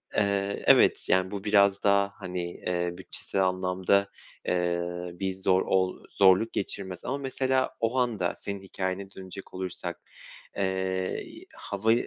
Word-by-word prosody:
Eee, 100 -1 0
evet, - - +5
yani, 95 0 +3
bu 100 -1 -5
biraz 100 -1 +4
daha, 100 0 +3
hani, 90 -2 -4
eee, 90 -1 -2
bütçesel 95 - -2
anlamda, 95 +2 +1 0.4
eee, 85 -1 +1 0.3
bir 95 +2 -2
zor 95 0 +2
ol 95 -1 0
zorluk 95 +3 +5
geçirmez 95 -2 -4
ama, 135 +3 -1
mesela, 130 -1 0
o 115 +3 0
anda 110 -8 +1
senin 100 -1 -5
hikâyene 95 0 -4
dönecek 95 0 -10
olursak, 90 -1 -5 0.6
eee, 95 -1 -2
hava 105 +3 +1
95 Hz, 130 wpm, -28 LUFS, 95-100 Hz, 0.6 s, evet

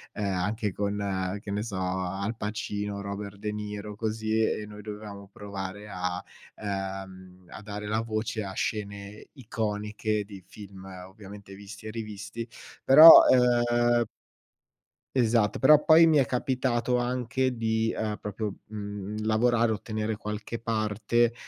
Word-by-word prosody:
uhm, 105 - -3
anche 100 +2 -1
con, 100 -2 -2
che 100 - -7
ne 105 +1 -1
so, 105 -5 -5
Al 95 +3 -2
Pacino, 105 -1 -4
Robert 100 0 -6
De 105 +1 -4
Niro, 105 0 -6
così 110 0 -1
e 105 -1 0
noi 105 0 -10
dovevamo 105 -2 -9
provare 100 0 -7
a, 90 -1 -3 0.3
ehm, 95 -2 -6
a 100 - -10
dare 105 0 -6
la 110 +1 0
voce 110 -1 -3
a 95 - -6
scene 100 -1 -4
iconiche 105 -3 -3
di 100 -3 -11
film, 100 -2 -12 0.2
ovviamente 100 0 -12
visti 105 +2 -10
e - - -5
rivisti 110 0 -6 0.4
però, 155 +5 +11
ehm 120 -1 +3 1.1
Esatto, 115 -4 +2
però 150 +4 +6
poi 165 +1 +7
mi 155 -2 +4
è 135 - +4
capitato 125 -1 0
anche 125 +1 -1
di, 110 0 0
ehm, 105 -1 -2
proprio, 105 0 -4
mhmm, 105 0 -6
lavorare, 115 +1 +2
ottenere 110 0 -3
qualche 105 +2 -5
parte 115 +1 0
105 Hz, 135 wpm, -27 LUFS, 100-115 Hz, 1.1 s, però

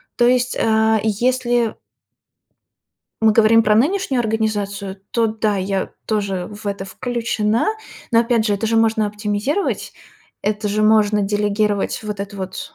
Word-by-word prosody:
То 240 - +3
есть, 250 0 +1
а, 220 0 +3
и 220 +1 0
если 240 +1 0 1.5
мы 220 - +5
говорим 225 +1 +5
про 210 0 +3
нынешнюю 280 - +1
организацию, 205 -3 -2
то 230 -1 +2
да, 215 -1 -1
я 190 0 -2
тоже 200 -4 -1
в 210 0 -10
это 200 -1 -3
включена. 230 0 -1 0.4
Но 230 - +5
опять 230 -1 +1
же, 205 - +2
это 200 +3 -2
же 225 +1 +1
можно 225 -1 +2
оптимизировать, 210 - -2 0.5
это 210 0 -1
же 210 +1 0
можно 215 -1 +4
делегировать 205 +1 0
вот 210 -2 -5
эту 200 0 -6
вот, 190 -1 -6
215 Hz, 145 wpm, -20 LUFS, 205-225 Hz, 1.5 s, мы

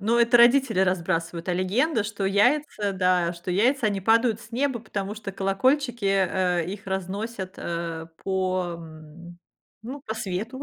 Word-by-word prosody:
Ну, 225 +4 +2
это 235 +1 +5
родители 240 -3 +5
разбрасывают, 170 -2 -1
а - - +2
легенда, 210 - +1
что 205 -1 -4
яйца, 205 +1 +2
да, 180 -2 +2
что 175 +1 -7
яйца, 235 +7 +2
они 200 -2 -1
падают 225 +2 +3
с 235 -1 -14
неба, 255 0 -1
потому 205 -2 -4
что 215 -2 -6
колокольчики, 240 +5 0
э, 185 -3 +1
их 200 +2 -7
разносят, 190 +1 -4
э, 170 -1 -4 0.2
по, 185 -2 -1
м, 165 +2 -12 0.4
ну, 260 +6 -7
по 220 - -4
свету, 220 +5 -4
195 Hz, 155 wpm, -25 LUFS, 180-230 Hz, 0.4 s, это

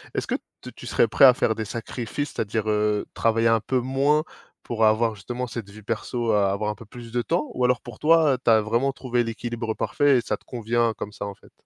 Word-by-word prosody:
Est-ce - - -1
que - - 0 0.3
tu - - -10
tu - - -10
serais - - +3
prêt 115 - +6
à 130 - +9
faire 110 - +1
des 110 - -3
sacrifices? 120 +5 -4
C'est-à-dire, 110 0 -2
heu, 105 0 +1
travailler 115 0 +2
un 115 0 +4
peu 130 +3 0
moins 135 +4 +2 0.4
pour 115 -2 -2
avoir 110 +1 +3
justement 120 +6 -5
cette 115 -4 -7
vie 105 +2 -13
perso, 115 +2 -2
a 100 -2 +3
avoir 105 +2 -1
un - - -7
peu 115 - -13
plus 115 +2 -11
de 120 +1 0
temps? 165 +4 -1
Ou 125 - -2
alors 125 -1 +2
pour 120 -3 -11
toi, 160 -2 +5
heu, - - -1
tu - - +2
as 110 -1 +6
vraiment 115 +6 0
trouvé 125 -2 -1
l'équilibre 115 0 -4
parfait 145 -2 +2
et - - +1
ça - - -2
te - - -30
convient 115 -1 0
comme 105 - -5
ça, 100 - -6
en 100 - -7
fait? - - -21
115 Hz, 245 wpm, -24 LUFS, 110-125 Hz, 0.4 s, à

